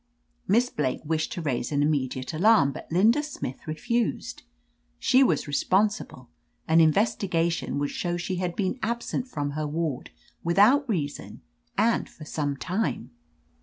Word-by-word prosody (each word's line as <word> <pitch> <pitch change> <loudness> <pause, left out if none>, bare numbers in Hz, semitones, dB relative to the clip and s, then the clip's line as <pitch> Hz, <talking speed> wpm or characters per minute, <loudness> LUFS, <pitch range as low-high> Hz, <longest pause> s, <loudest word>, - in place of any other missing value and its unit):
"Miss 240 +5 +3
Blake 130 -4 -1
wished 155 0 -1
to 175 - -5
raise 125 -3 -2
an 145 -1 +2
immediate 130 -2 -1
alarm, 180 -4 +4
but 135 - -10
Linda 220 - +4
Smith 280 - -7
refused. 235 +9 -2 0.6
She 260 - +4
was - - +1
re 145 - -6
sponsible: 190 - 0 0.4
an 160 +1 +5
investigation 170 -1 +1
would 145 0 -1
show 175 -1 -2
sh^ 180 +1 -3
had 180 -2 -2
been 200 +5 -1
absent 235 +2 -2
from 145 - -3
her 155 +1 -3
ward 155 -3 -3 0.3
without 215 - +4
reason, 150 -9 -3 0.4
and 230 0 +2
for 155 - -12
some 145 -2 -2
time. 180 - -2
170 Hz, 145 wpm, -26 LUFS, 145-215 Hz, 0.6 s, an